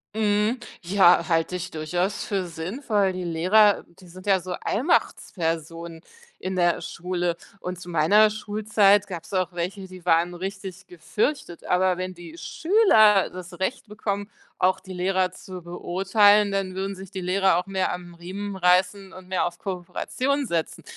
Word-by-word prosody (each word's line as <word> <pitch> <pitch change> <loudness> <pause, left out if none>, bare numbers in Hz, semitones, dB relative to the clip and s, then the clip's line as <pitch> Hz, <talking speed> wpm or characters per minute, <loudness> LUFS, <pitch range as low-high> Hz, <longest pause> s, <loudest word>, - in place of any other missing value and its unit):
Mhm, 210 +2 +1 0.2
ja, 175 -2 +4
halte 165 +1 +1
ich 180 - -4
durchaus 175 +5 -2
für 195 -3 -2
sinnvoll. 195 - -1
Die 185 0 -5
Lehrer, 185 +5 +3 0.2
die 185 - -15
sind 185 +2 -13
ja 195 -2 +3
so 180 +1 -6
Allmachtspersonen 165 - -2 0.4
in 185 0 -4
der 175 -1 +2
Schule, 175 -1 -2 0.2
und 180 -1 -6
zu 180 -1 -10
meiner 190 +7 +5
Schulzeit 210 -1 +2
gab's 180 0 -8
auch 185 -1 0
welche, 185 +3 -4
die 185 -1 -13
waren 170 +1 +3
richtig 190 0 -7
gefürchtet, 175 - -3
aber 185 0 +2
wenn 185 0 -4
die 170 -1 -11
Schüler 225 - +4
das 180 0 -10
Recht 225 +4 -2
bekommen, 205 -1 -4 0.3
auch 185 +1 +2
die 190 -1 -10
Lehrer 185 0 0
zu 185 -1 -10
beurteilen, 200 +4 +3
dann 195 -1 -2
würden 195 +1 -3
sich 190 +1 -11
die 190 - -5
Lehrer 190 0 +2
auch 180 - -2
mehr 190 -1 -1
am 175 -1 -8
Riemen 195 +3 -6
reißen 190 +2 +2
und 185 -1 -12
mehr 185 -1 0
auf 175 0 -5
Kooperation 255 +9 -2
setzen. 165 -4 -3
185 Hz, 155 wpm, -24 LUFS, 175-200 Hz, 0.4 s, meiner